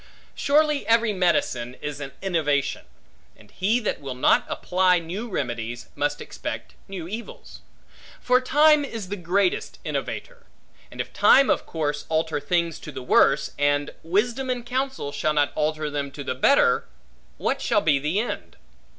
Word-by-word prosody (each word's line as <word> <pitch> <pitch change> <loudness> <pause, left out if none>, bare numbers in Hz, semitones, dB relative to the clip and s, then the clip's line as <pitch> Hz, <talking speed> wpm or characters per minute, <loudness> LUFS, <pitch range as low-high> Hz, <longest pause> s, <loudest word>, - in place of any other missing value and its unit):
Surely 300 0 +2
every 230 -1 +3
medicine 130 -10 0
is 145 -1 -5
an 140 -1 -6
innovation; 150 -7 0 0.5
and 105 -1 -19
he 215 +6 +1
that 215 - -3
will 135 -2 -5
not 125 - +4
apply 180 0 +2
new 180 +8 -5
remedies, 120 - -4
must 145 0 -1
expect - - -6
new 185 -4 -6
evils; 235 - -8 0.6
for 250 0 +3
time 295 +3 +5
is 225 -8 -6
the 205 - -2
greatest 185 +1 0
innovator; - - -5 0.4
and - - -13
if - - -4
time 275 0 +6
of - - -1
course 150 -2 -3
alter 160 -1 0
things 170 0 -1
to 155 - -9
the 130 -2 -7
worse, 135 +2 +3
and 145 0 +1
wisdom 235 +10 0
and 245 -2 -2
counsel 260 - -2
shall 150 +2 0
not 145 -1 +2
alter 155 0 -1
them 145 -1 -3
to 140 +1 -8
the 130 - -2
better, 280 - +3 0.5
what 275 - -1
shall 225 -3 +2
be 150 -6 +3
the 150 +8 0
end? 235 - -4
175 Hz, 160 wpm, -24 LUFS, 145-235 Hz, 0.6 s, time